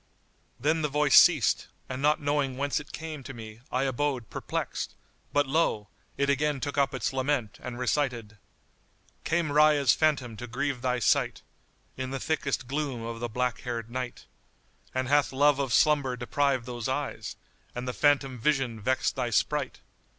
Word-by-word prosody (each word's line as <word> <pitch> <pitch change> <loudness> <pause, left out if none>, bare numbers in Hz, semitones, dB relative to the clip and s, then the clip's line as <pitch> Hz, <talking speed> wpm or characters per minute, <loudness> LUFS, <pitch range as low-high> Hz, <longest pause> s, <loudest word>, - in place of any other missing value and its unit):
Then 155 +5 +1
the 150 - +1
voice 150 +1 +2
ceased - - +6 0.2
and 130 0 -5
not 150 +1 +3
knowing 145 -3 0
whence 140 +1 0
it 145 - -11
came 155 -2 -6
to 135 0 -9
me 110 -1 -10
I 130 +1 +1
abode 135 -2 -1
perplexed; - - -4 0.4
but 145 0 +3
lo! 135 -7 0 0.3
it 140 - +1
again 145 0 +1
took 145 +2 -3
up 140 -2 +2
its 130 +1 -2
lament 130 -4 -1
and 125 -1 -6
recited, 125 -5 -1 0.8
"Came 165 -2 0
Rayya's 150 -3 +5
phantom 140 -7 +1
to 120 - -6
grieve 130 +2 -2
thy 125 -1 0
sight 120 - +1 0.3
* - - -38
In 130 0 -3
the 135 0 -3
thickest 140 -3 -1
gloom 135 -3 -2
of 115 0 -5
the 120 0 -3
black 125 +1 -1
haired 115 -2 -5
Night! 125 0 -5 0.7
And 130 0 0
hath 145 +1 +3
love 140 +1 +3
of 135 -3 -1
slumber 140 -2 +3
deprived 130 0 0
those 120 -2 -4
eyes - - -3 0.2
* - - -35
And 125 +1 -4
the 125 - -2
phantom 140 -3 +2
vision 135 -3 0
vexed 130 +5 0
thy 125 -3 -1
sprite? 140 +5 0
135 Hz, 170 wpm, -28 LUFS, 125-145 Hz, 0.8 s, ceased